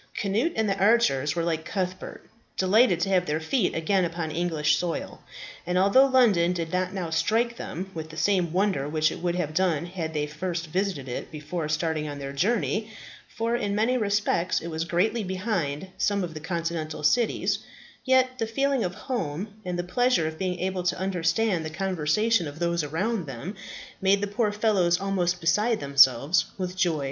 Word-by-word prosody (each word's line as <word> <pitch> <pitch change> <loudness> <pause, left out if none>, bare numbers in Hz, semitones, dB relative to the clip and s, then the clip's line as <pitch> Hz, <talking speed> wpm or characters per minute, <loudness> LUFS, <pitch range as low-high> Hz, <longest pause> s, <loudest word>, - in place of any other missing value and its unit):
Cnut 215 - 0
and 220 -1 +1
the 195 0 -1
archers 155 - +3
were, 170 - 0
like 165 -1 -1
Cuthbert, 185 0 -4 0.3
delighted 190 -1 +4
to 195 - 0
have 180 -2 +2
their 150 +1 0
feet 185 +6 0
again 185 +4 +1
upon 165 -2 -3
English 155 -2 +1
soil; 175 -2 -4 0.4
and 180 +1 -1
although 200 +9 +5
London 210 -10 +4
did 165 -1 -4
not 185 0 0
now 180 -4 -4
strike 225 +9 +1
them 190 +3 -6
with 160 -1 -6
the 155 - -10
same 180 -4 +1
wonder 185 -6 0
which 155 0 +2
it - - -6
would 175 0 -1
have 160 -4 -2
done 170 -2 +1
had 170 -3 -5
they 150 -1 0
first 170 +3 -4
visited 180 -4 -2
it 125 - -5
before 155 +1 -5
starting 155 0 -1
on 145 - -6
their 140 0 -6
journey 215 +6 0 0.4
for 230 +1 -1
in 205 -4 -1
many 225 +4 +2
respects 205 -5 +1
it 170 - -6
was 160 0 -3
greatly 205 +7 +1
behind 185 -5 -2
some 205 -2 +1
of 170 -2 -5
the 155 - -6
continental 165 -1 -3
cities 235 +9 +2 0.4
yet 260 -1 +2
the 225 - 0
feeling 275 +2 +1
of 180 -1 -3
home, 200 - -3
and 180 -2 -3
the 175 - -1
pleasure 245 +1 +2
of 160 0 -6
being 180 -1 -2
able 185 0 -1
to 180 0 0
understand 185 +1 0
the 155 - -4
conversation 185 +3 +1
of 145 +1 -8
those 170 -1 0
around 180 +5 -2
them, 135 - -6 0.5
made 195 +1 +4
the 205 - -1
poor 205 +1 0
fellows 200 -5 +2
almost 180 -3 0
beside 210 +8 +2
themselves 140 +2 +4
with 185 -1 -4
joy. 175 -4 +1
180 Hz, 185 wpm, -26 LUFS, 160-205 Hz, 0.5 s, although